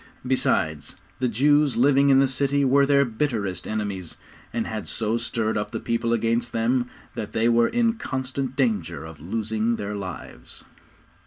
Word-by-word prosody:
Besides, 80 - 0 0.2
the 130 - +1
Jews 145 +4 +3
living 140 +2 +4
in 135 - +6
the 135 0 +5
city 140 +1 +1
were 140 +1 +4
their 140 0 +4
bitterest 110 - -2
enemies, 100 -5 -4 0.3
and 115 -1 -2
had 110 -1 -5
so 110 0 -1
stirred 115 -2 -1
up 105 0 -3
the 115 0 -4
people 115 0 -1
against 115 +1 0
them, 120 +2 +1 0.2
that 105 0 -6
they 110 +1 +2
were 120 0 +4
in 235 -1 +2
constant 130 - -4
danger 95 - -1
of 80 -1 -11
losing 110 +5 -1
their 105 -1 -4
lives. 95 -4 -8
115 Hz, 160 wpm, -24 LUFS, 105-135 Hz, 0.3 s, in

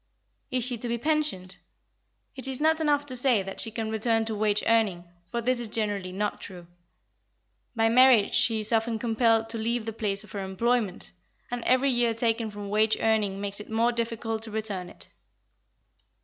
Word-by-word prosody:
Is 255 -1 0
she 245 -1 0
to 240 - -5
be 235 0 -1
pensioned? 290 -10 -1 0.8
It 265 0 -6
is 265 -1 -3
not 315 +1 +2
enough 290 -2 +2
to 260 -3 -5
say 245 -5 +2
that 195 0 -3
she - - +1
can 220 0 -4
return 225 0 +1
to 220 - -2
wage 210 0 +1
earning, 215 -6 +2 0.3
for 235 - -2
this 250 +1 +1
is 240 - -3
generally 205 -4 -1
not 205 +3 -3
true. 180 -3 -9 1.1
By 225 0 +3
marriage 240 -2 +5
she 225 -3 +3
is 215 - -3
often 225 0 +1
compelled 225 0 +2
to 225 0 -4
leave 230 +1 -1
the 225 - -4
place 205 -2 -2
of 210 - -15
her 200 -1 -4
employment, 205 - -1 0.4
and 245 -1 -3
every 260 +2 +3
year 240 -2 +2
taken 230 -1 0
from 205 -1 -7
wage 215 +1 +3
earning 210 -3 +1
makes 200 0 -4
it 210 - -10
more 230 +2 +2
difficult 230 -1 -3
to 225 - -7
return 210 -4 -4
to - - -12
it. - - -12
225 Hz, 190 wpm, -27 LUFS, 210-240 Hz, 1.1 s, marriage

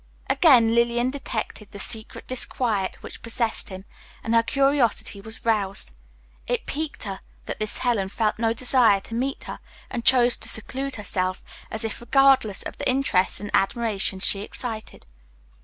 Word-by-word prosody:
Again 245 -9 +5
Lillian 235 +1 +2
detected 225 -6 -5
the - - -9
secret 220 +2 -3
disquiet 230 -6 0
which - - -9
possessed 230 0 +1
him, 190 0 -9 0.4
and 225 - -1
her 230 - +6
curiosity 255 -5 +1
was 220 +3 -9
roused. 200 - +1 0.6
It - - -1
piqued 310 0 -4
her 195 -3 -5 0.3
that - - -5
this 215 -1 -3
Helen 220 -6 0
felt 215 +1 -1
no 225 -1 +2
desire 235 -3 +4
to 225 - -11
meet 265 +4 -2
her - - -7 0.3
and 235 - -3
chose 245 -1 +5
to 220 - -3
seclude 265 +5 -3
herself, 185 -3 -3 0.3
as 220 - -2
if 225 +1 -4
regardless 265 -5 +3
of - - -8
the - - 0
interest 255 -8 +2
and 205 0 -6
admiration 200 -2 +1
she 195 +1 +3
excited. 220 +1 -6
225 Hz, 155 wpm, -24 LUFS, 205-250 Hz, 0.6 s, her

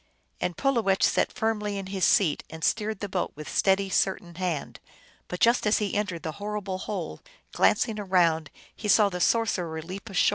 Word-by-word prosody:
And 180 - -2
Pulowech 230 -8 +1
sat - - +2
firmly 210 -2 -1
in 195 - -4
his 190 -1 0
seat, 170 -7 +3
and 160 0 -9
steered 215 +1 0
the 205 - -2
boat 185 -2 -2
with 150 +1 -8
steady, 195 0 +2
certain 190 -2 0
hand; 175 -4 -3 0.5
but 180 - -5
just 235 -1 +3
as 210 - +4
he 205 -3 -2
entered 205 -5 -2
the 160 - -3
horrible 205 -2 -3
hole, 190 -5 -5 0.3
glancing 220 -3 +2
around, 170 -6 +2 0.3
he 215 - -5
saw 210 0 +5
the 180 -2 -5
sorcerer 180 -9 +1
leap 190 +6 -8
ashore. 195 - +3
195 Hz, 180 wpm, -27 LUFS, 180-210 Hz, 0.5 s, saw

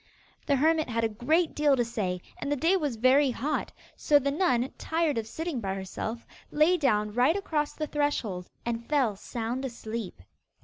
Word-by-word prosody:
The 285 - +4
hermit 315 +1 +2
had 230 0 -1
a - - +4
great 280 +11 +1
deal 295 -2 +3
to 240 -2 +1
say, 185 -6 -2 0.2
and 285 - -3
the - - +3
day 330 +7 +3
was 295 -9 -1
very 260 +5 +4
hot, 270 +5 -2 0.2
so 295 - +4
the 280 0 0
nun, 275 -6 +1
tired 320 -6 0
of 220 - -5
sitting 315 0 -4
by 195 -2 -2
herself, 205 +4 -5 0.2
lay 310 +4 +4
down 210 -10 +1
right 255 +8 +3
across 305 -7 -1
the 310 - -3
threshold, 265 -12 -2 0.2
and 235 0 -3
fell 265 -8 +2
sound 235 +5 -4
asleep. 225 - -6
260 Hz, 180 wpm, -28 LUFS, 225-300 Hz, 0.2 s, The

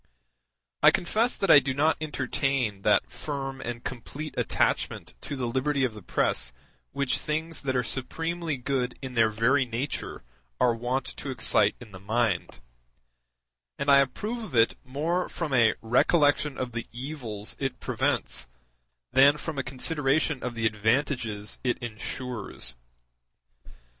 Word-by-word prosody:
I - - +9
confess 225 +7 +1
that 195 - +3
I 145 - +10
do 130 -1 -2
not 155 +3 +3
entertain 130 -7 -1
that - - +3
firm 135 -2 -5
and 120 0 -5
complete 140 +5 -6
attachment - - 0
to - - -5
the 130 -2 -2
liberty 135 +3 0
of 125 -4 +1
the 105 - -10
press 65 -8 0 0.4
which 140 -2 0
things 160 +2 -2
that 130 -2 -1
are 125 - +2
supremely 160 +5 -2
good 125 -1 -1
in 130 -1 -5
their 115 -2 +4
very 115 +6 +3
nature 125 +3 -4 0.4
are 120 - +4
wont 120 +3 -1
to 140 - -6
excite 120 -4 +3
in 115 -4 -12
the 95 - -10
mind; 105 -1 -1 1.2
and 140 +1 +2
I 140 - +8
approve 210 - -1
of 205 - -7
it 115 0 +4
more 155 +8 -1
from 160 -5 -3
a 115 -3 +5
recollection 145 +4 +3
of 125 -1 -3
the 115 0 -5
evils 120 -5 -5
it 135 -1 -2
prevents - - -1 0.6
than 140 +2 +6
from 155 -2 -4
a - - 0
consideration 140 +1 +1
of 125 -1 -4
the 115 -1 -1
advantages 110 -1 0
it 125 -2 +1
ensures. 120 - -5
130 Hz, 145 wpm, -27 LUFS, 115-145 Hz, 1.2 s, I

